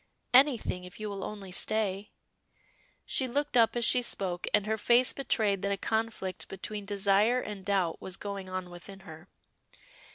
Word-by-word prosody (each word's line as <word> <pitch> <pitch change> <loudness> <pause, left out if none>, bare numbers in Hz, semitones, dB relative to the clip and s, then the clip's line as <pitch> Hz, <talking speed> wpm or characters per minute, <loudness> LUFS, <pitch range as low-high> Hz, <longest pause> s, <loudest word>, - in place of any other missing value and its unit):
"Anything, 250 -8 +4
if 180 +2 -11
you 215 -1 -4
will 195 -1 -5
only 200 -3 -7
stay." 205 0 -1 1.0
She 260 - +1
looked 285 +3 -2
up 230 -1 +4
as 240 -1 +1
she 250 - +4
spoke, 185 -6 -2
and 210 -1 +2
her 220 +1 0
face 240 +3 +4
betrayed 215 -7 0
that 200 - -1
a 200 - 0
conflict 220 -3 -2
between 205 +2 -6
desire 205 +4 +3
and 210 -5 -6
doubt 185 -4 0
was 190 0 -4
going 200 -2 -6
on 185 -1 -5
within 190 +3 -11
her. 160 -2 -12
200 Hz, 165 wpm, -30 LUFS, 190-225 Hz, 1.0 s, Anything